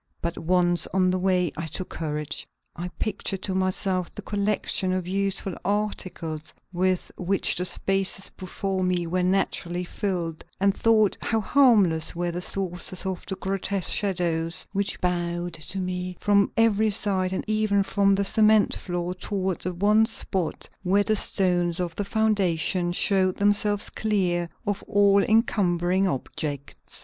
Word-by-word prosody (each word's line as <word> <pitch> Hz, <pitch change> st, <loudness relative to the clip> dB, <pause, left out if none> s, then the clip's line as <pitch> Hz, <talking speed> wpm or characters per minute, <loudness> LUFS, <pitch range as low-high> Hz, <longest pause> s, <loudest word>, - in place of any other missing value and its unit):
But 170 Hz, 0 st, -3 dB
once 175 Hz, 0 st, +1 dB
on 185 Hz, -1 st, +3 dB
my 185 Hz, -, 0 dB
way 180 Hz, -2 st, +1 dB
I 160 Hz, 0 st, -4 dB
took 185 Hz, +4 st, -5 dB
courage. 150 Hz, -2 st, -4 dB, 0.3 s
I 175 Hz, +2 st, -4 dB
pictured 195 Hz, -2 st, -2 dB
to 190 Hz, -, -2 dB
myself 185 Hz, -1 st, 0 dB
the 210 Hz, -, -7 dB
collection 200 Hz, -2 st, 0 dB
of 185 Hz, -1 st, -2 dB
useful 195 Hz, 0 st, -1 dB
articles 180 Hz, -6 st, -3 dB, 0.2 s
with 185 Hz, 0 st, 0 dB
which 190 Hz, +2 st, +1 dB
the 180 Hz, -, -2 dB
spaces 195 Hz, +1 st, 0 dB
before 190 Hz, +1 st, -4 dB
me 180 Hz, -1 st, 0 dB
were 180 Hz, +2 st, -1 dB
naturally 180 Hz, -1 st, 0 dB
filled, 175 Hz, -3 st, -3 dB, 0.2 s
and 200 Hz, 0 st, +2 dB
thought 220 Hz, -3 st, +3 dB
how 225 Hz, -, 0 dB
harmless 205 Hz, -, +3 dB
were 175 Hz, 0 st, -1 dB
the 175 Hz, +1 st, -4 dB
sources 185 Hz, 0 st, -4 dB
of 190 Hz, -2 st, -3 dB
the 190 Hz, -, -3 dB
grotesque 195 Hz, 0 st, -1 dB
shadows 170 Hz, -4 st, 0 dB
which 200 Hz, 0 st, -1 dB
bowed 175 Hz, -1 st, -1 dB
to 165 Hz, +4 st, -4 dB
me 180 Hz, -1 st, -3 dB
from 200 Hz, -1 st, +3 dB
every 220 Hz, -1 st, +3 dB
side 195 Hz, -3 st, 0 dB
and 190 Hz, -, -2 dB
even 215 Hz, -2 st, +1 dB
from 200 Hz, 0 st, +2 dB
the 200 Hz, 0 st, 0 dB
cement 215 Hz, +1 st, +5 dB
floor 175 Hz, -1 st, -3 dB
toward 190 Hz, -1 st, -3 dB
the 185 Hz, -, -2 dB
one 210 Hz, +5 st, +3 dB
spot 190 Hz, -6 st, -1 dB
where 195 Hz, +2 st, +2 dB
the 215 Hz, +1 st, +2 dB
stones 180 Hz, -4 st, +2 dB
of 175 Hz, -2 st, -3 dB
the 205 Hz, -, -2 dB
foundation 190 Hz, -5 st, +1 dB
showed 185 Hz, 0 st, +1 dB
themselves 205 Hz, 0 st, +1 dB
clear 180 Hz, -5 st, 0 dB, 0.2 s
of 205 Hz, -1 st, -2 dB
all 200 Hz, -1 st, +4 dB
encumbering 190 Hz, -4 st, +2 dB
objects. 140 Hz, -, -5 dB
185 Hz, 150 wpm, -25 LUFS, 175-200 Hz, 0.3 s, cement